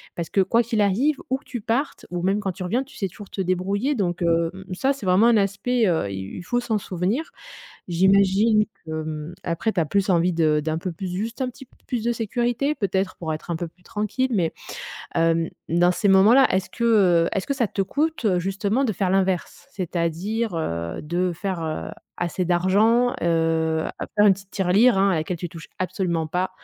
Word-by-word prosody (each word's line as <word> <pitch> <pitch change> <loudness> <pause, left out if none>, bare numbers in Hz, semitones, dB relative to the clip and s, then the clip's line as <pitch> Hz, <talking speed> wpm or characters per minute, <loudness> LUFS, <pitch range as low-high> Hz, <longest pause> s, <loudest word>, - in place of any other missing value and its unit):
Parce 170 -1 -4
que 195 - +3
quoi 230 +5 +3
qu'il 225 -2 0
arrive, 250 +10 +2
où 265 - +1
que 280 - -22
tu 240 -3 -6
partes 245 +7 -2
ou 175 -1 -3
même 195 +3 +2
quand 195 -3 -2
tu 185 - -7
reviens, 230 +9 0
tu 275 - -17
sais 195 - -2
toujours 205 +2 -12
te 195 - -4
débrouiller 195 +9 0
donc 180 -7 -1
hem, 170 +2 0
ça 265 +9 +1
c'est 270 -7 -9
vraiment 185 +5 +5
un 230 -2 +5
aspect, 205 +4 +1
heu, 160 - +1
il 95 0 -6
il 175 - -7
faut 245 +6 0
s'en 225 -3 0
souvenir. 195 - -2 0.6
J'imagine 195 +4 +4 0.2
que, 160 - -9
mmh, 155 +2 -6
après 175 +6 -1
tu 185 - 0
as 165 - +2
plus 200 +5 +1
envie 175 0 +3
de 155 -2 +2
d'un 155 +1 -2
peu 180 +1 -4
plus 180 +3 -5
juste 225 +7 -4
un 255 - 0
petit 270 +2 -13 0.2
plus 240 -3 -2
de 240 - +2
sécurité, 240 +5 -1
peut-être 190 - -1
pour 160 -2 -3
être 155 +3 -6
un 170 - 0
peu 170 0 -4
plus 180 +2 -28
tranquille 215 +5 -2
mais 170 -5 +1 0.6
hem, 165 0 +2 0.2
dans 175 +2 +3
ces 205 - 0
moments-là, 210 +8 +7
est-ce 190 0 0
que 235 - -3 0.4
heu - - 0
est-ce 195 - -2
que 280 - -1
ça 240 -6 0
te 195 - -1
coûte 295 +6 -1
justement 200 +8 0
de 225 - +1
faire 190 -1 -1
l'inverse? 190 +6 0
C'est-à-dire, 185 - -2
heu, 85 - -3
de 175 +3 -1
faire, 180 0 -3
heu, 155 -1 -4 0.3
assez 175 +1 -2
d'argent, 200 +8 +3
heu - - 0
heu, 160 -1 +1 0.3
faire 210 0 +6
une 200 - +7
petite 195 0 -15
tirelire, 195 +4 +3
hein, 195 +1 +4
à - - +2
laquelle 160 +3 -2
tu 175 - -4
touches 165 -1 -10
absolument 180 -3 -1
pas, 180 +4 -1
190 Hz, 210 wpm, -23 LUFS, 170-220 Hz, 0.6 s, moments-là